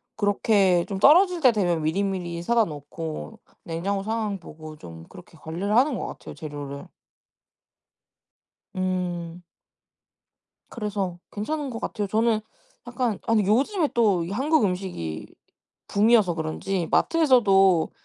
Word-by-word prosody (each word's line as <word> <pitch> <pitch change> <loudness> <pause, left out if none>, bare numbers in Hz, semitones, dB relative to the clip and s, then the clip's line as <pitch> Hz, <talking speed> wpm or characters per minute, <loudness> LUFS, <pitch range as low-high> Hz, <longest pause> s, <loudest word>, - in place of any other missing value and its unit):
그렇게 200 -3 +2
좀 195 -1 -3
떨어질 355 - +5
때 255 -6 +5
되면 175 -6 0
미리미리 175 0 -2
사다 230 +1 +3
놓고 160 +7 -7 0.2
냉장고 195 +2 -3
상황 215 -2 -2
보고 155 -2 -11
좀 85 - -12
그렇게 180 -2 -15
관리를 175 +7 -4
하는 265 -1 +3
것 - - -4
같아요, - - -10
재료를. 145 -2 -8 1.9
음. 180 -2 -3 1.3
그래서 200 -6 -3
괜찮은 285 +7 -3
것 230 - -5
같아요. 205 -2 -3
저는 220 +1 +1 0.5
약간 245 -4 -2
아니 220 -2 +2
요즘에 290 - +2
또 205 -8 +2
이 175 - -7
한국 275 +4 +2
음식이 180 - -3 0.6
붐이어서 205 -4 +3
그런지 165 +2 -3
마트에서도 195 - +4
195 Hz, 265 characters per minute, -24 LUFS, 170-225 Hz, 1.9 s, 떨어질